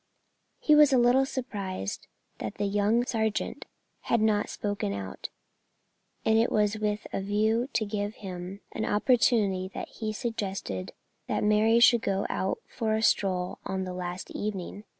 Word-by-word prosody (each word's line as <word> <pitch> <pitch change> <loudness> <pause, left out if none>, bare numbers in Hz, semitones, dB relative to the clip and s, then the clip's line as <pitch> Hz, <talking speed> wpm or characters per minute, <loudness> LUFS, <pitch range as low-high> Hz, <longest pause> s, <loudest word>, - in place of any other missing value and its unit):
He 305 - +4
was 300 -2 +7
a 260 - +5
little 250 +2 +4
surprised 200 - -4 0.3
that 110 - -4
the 205 - -1
young 205 +4 +2
sergeant 220 -3 -1 0.3
had 235 - +1
not 215 -1 +2
spoken 205 - -2
out, 100 -1 -6 1.0
and 220 0 +4
it 230 - +2
was 210 0 +2
with 210 0 -1
a - - -1
view 220 +5 +1
to 220 - +1
give 205 0 -3
him 185 0 -7
an - - -3
opportunity 210 -4 +2
that - - -5
he 220 - -6
had 215 - -2
suggested 195 - -4 0.3
that - - -1
Mary 215 +2 +4
should 235 -1 +6
go 195 -2 0
out 190 - -1
for 220 -3 -1
a 220 - -1
stroll 185 -4 +1
on 190 0 -2
the 185 -1 -5
last 180 0 -5
evening. 205 0 -4
210 Hz, 160 wpm, -28 LUFS, 190-225 Hz, 1.0 s, was